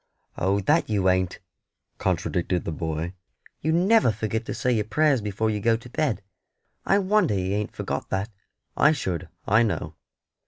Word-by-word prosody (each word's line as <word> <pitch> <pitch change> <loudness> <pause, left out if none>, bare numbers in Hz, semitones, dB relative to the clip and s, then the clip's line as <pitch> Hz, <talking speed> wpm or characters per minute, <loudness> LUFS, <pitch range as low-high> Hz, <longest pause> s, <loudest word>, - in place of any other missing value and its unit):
"Oh, 95 +3 +1
that 150 - +2
you 100 -3 +2
ain't," 95 -1 +1 0.6
contradicted 90 0 -1
the - - -2
boy, 80 +2 -3 0.5
"You 160 - +1
never 185 - +4
forget 110 +1 -3
to - - -2
say 125 - 0
your 110 -4 +1
prayers 145 +1 +2
before 105 +2 -1
you 105 - -2
go 115 +2 +2
to 120 +2 -13
bed. 130 -10 -1 0.6
I 195 - +5
wonder 200 - +2
you 95 0 -1
ain't 105 0 -2
forgot - - -4
that; 100 +4 -2 0.4
I 150 +2 +5
should, 90 - -3 0.2
I 110 +3 +4
know." 115 -3 -1
105 Hz, 165 wpm, -25 LUFS, 95-140 Hz, 0.6 s, I